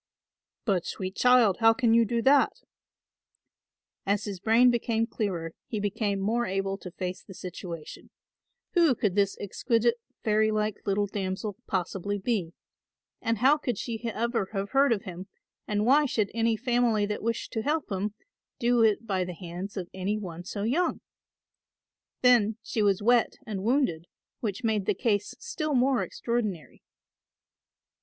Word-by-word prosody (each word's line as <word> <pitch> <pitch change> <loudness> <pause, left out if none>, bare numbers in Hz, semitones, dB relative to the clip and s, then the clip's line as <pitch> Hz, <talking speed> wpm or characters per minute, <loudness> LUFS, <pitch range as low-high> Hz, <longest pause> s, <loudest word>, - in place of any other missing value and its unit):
"But, 190 -6 +1
sweet 190 +1 -4
child, 250 -6 +5
how 225 0 +6
can 230 -1 +2
you 230 0 +5
do 230 +1 -1
that?" 275 +1 +5 1.5
As 200 +1 0
his 200 -3 -5
brain 230 +5 +5
became 230 -1 0
clearer 185 -8 -3 0.2
he 215 - -3
became 205 0 -1
more 230 +5 0
able 195 +1 -1
to 180 - -8
face 180 +1 -5
the 190 - -12
situation. 175 -3 -8 0.6
Who 335 -7 +4
could 205 -4 0
this 200 0 +1
exquisite 230 +3 +1 0.3
fairy 215 0 +3
like 215 -1 0
little 205 +1 +2
damsel 195 +1 -3
possibly 195 +1 -2
be, 195 -5 -1 0.7
and 230 -1 0
how 270 +7 +5
could 245 -7 -2
she 230 +1 -5
ever 230 -2 -1
have 200 0 -2
heard 275 0 +4
of 210 -4 +1
him 185 +1 -8 0.4
and 210 0 0
why 285 +4 +5
should 215 -5 0
any 230 0 +1
family 240 -3 +2
that 210 0 -3
wished 230 +1 -2
to 220 - -1
help 295 -1 -1
him 200 +2 -2 0.4
do 240 -2 +2
it 220 0 +3
by 190 -4 0
the 180 -1 -6
hands 180 +4 -7
of 180 -2 -3
any 190 +3 -1
one 175 -4 -7
so 200 +2 -4
young? 300 +11 0 1.2
Then 225 -4 +5
she 220 - -2
was 200 -1 +2
wet 240 0 +3
and 205 -3 -4
wounded, 225 - +1 0.3
which 215 +1 -3
made 215 -4 0
the - - +2
case 205 -1 0
still 310 - -3
more 255 0 +3
extraordinary. 215 -9 -3
215 Hz, 155 wpm, -28 LUFS, 195-235 Hz, 1.5 s, how